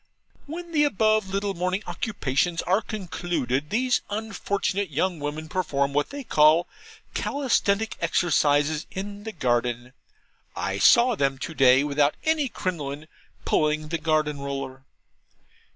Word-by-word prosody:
When 340 +3 -7
the 300 -2 +3
above 215 -6 +2
little 200 +1 -1
morning 185 +3 -2
occupations 165 - -1
are 190 +4 +2
concluded, 165 - -3
these 250 +5 +1
unfortunate 205 -2 -2
young 170 +4 -1
women 150 +2 -4
perform 140 -6 -1
what 145 +1 +1
they 285 0 -7
call 155 -3 +4 0.5
Calisthenic 220 -6 0
Exercises 155 -2 +2
in 205 0 -7
the 220 - -4
garden. 120 - -1 0.6
I - - -2
saw 245 0 +6
them 135 -8 0
to 150 +4 -5
day, 130 -2 +5
without 145 0 +2
any 315 -4 +1
crinoline, 155 -7 -4 0.4
pulling 155 0 +1
the 165 0 -2
garden 155 -2 0
roller. 135 -1 -5
170 Hz, 125 wpm, -25 LUFS, 145-205 Hz, 0.6 s, saw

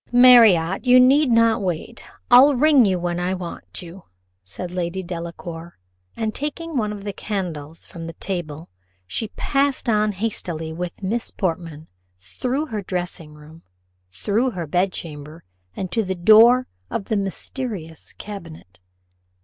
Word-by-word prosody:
"Marriott, 225 -8 +6
you 250 0 +6
need 270 +3 +5
not 230 -1 +3
wait; 190 +5 -4 0.3
I'll 265 +4 +8
ring 270 -6 +5
when 175 0 -1
I 180 +1 -1
want 180 0 -7
you," 175 +2 -12 0.4
said 140 - -7
Lady 180 +1 -3
Delacour; 170 -1 -7 0.4
and 220 -1 -2
taking 305 +4 -5
one 215 -5 0
of 205 -1 -7
the 205 -1 -4
candles 165 -8 -5
from 165 -1 -9
the 165 - -7
table, 165 -4 -5 0.4
she 155 - -3
passed 275 -1 0
on 215 -2 +2
hastily 175 -6 -4
with 175 +3 -6
Miss 225 +5 -1
Portman 165 -4 -4 0.3
through 250 - -3
her 220 -8 -4
dressing 175 -4 -5
room, 155 +2 -15 0.5
through 210 - 0
her 180 -8 -5
bedchamber, 160 -3 -3 0.3
and 185 -2 -5
to 225 +5 +1
the 190 -1 -3
door 225 +7 +6 0.2
of 195 - -3
the 220 - -1
mysterious 195 - -5
cabinet. 165 - -10
190 Hz, 140 wpm, -22 LUFS, 170-230 Hz, 0.5 s, I'll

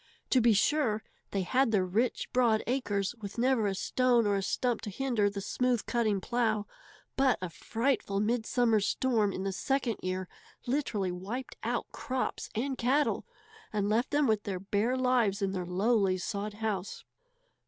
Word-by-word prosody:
To 255 - +5
be 230 -1 +5
sure, 220 -1 +2 0.3
they 195 -1 -1
had 255 +6 +2
their 195 -4 +2
rich, 225 +9 -1
broad 235 -4 +3
acres, 215 -6 -1
with 200 +1 -7
never 245 -3 +2
a 195 - -1
stone 245 +3 +2
or 205 -1 +2
a 195 - 0
stump 240 +4 0
to 215 - -5
hinder 225 -1 +1
the 200 0 -5
smooth 245 +3 0
cutting 220 -5 +1
plow, 220 0 0 0.5
but 270 -2 +3
a 185 -2 -5
frightful 225 0 -1
midsummer 230 +1 +2
storm 215 0 +1
in 190 - -4
the 195 - -1
second 250 +2 -1
year 185 0 -3 0.4
literally 240 -8 -1
wiped 205 +9 -5
out - - -1
crops 260 -3 -3
and 260 +4 -2
cattle, 275 +5 +1 0.4
and 205 -1 0
left 230 +4 +1
them 290 0 +2
with 215 -4 +2
their 195 -3 -4
bare 210 +6 0
lives 245 -6 +2
in 195 -2 0
their 180 -2 -3
lowly 195 +1 +2
sod 205 +2 -4
house. 210 -3 -3
220 Hz, 165 wpm, -30 LUFS, 200-250 Hz, 0.5 s, To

